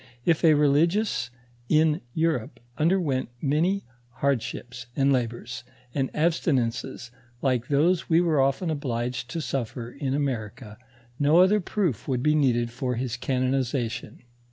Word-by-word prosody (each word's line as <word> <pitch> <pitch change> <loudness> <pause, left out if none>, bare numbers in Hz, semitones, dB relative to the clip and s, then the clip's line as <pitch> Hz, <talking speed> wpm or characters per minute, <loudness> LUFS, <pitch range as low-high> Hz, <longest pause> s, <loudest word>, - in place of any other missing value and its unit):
If 165 -2 +2
a 160 -2 +6
religious 150 - +2 0.4
in 155 0 +3
Europe 160 -8 -1 0.2
underwent 155 -6 +1
many 165 +9 +1 0.3
hard 135 -1 +1
ships 120 +1 -7
ana 140 0 +4
labors, 120 -1 -3 0.3
and 135 -2 0
abstinences 135 -6 0 0.3
like 125 -3 +1
those 165 +5 +2
we 165 0 +5
were 165 -5 +3
often 135 +6 +1
obliged 125 -3 -3
to 165 +5 -3
suffer 125 -3 -4
in 135 -1 -2
America, 120 -5 -4 0.4
no 145 +3 +4
other 190 +4 +5
proof 180 - -2
would 130 -3 -1
be 150 - +4
needed 120 -6 +2
for 125 +1 -2
his 120 -1 -2
canonization. 125 -2 -2
135 Hz, 130 wpm, -26 LUFS, 125-155 Hz, 0.4 s, a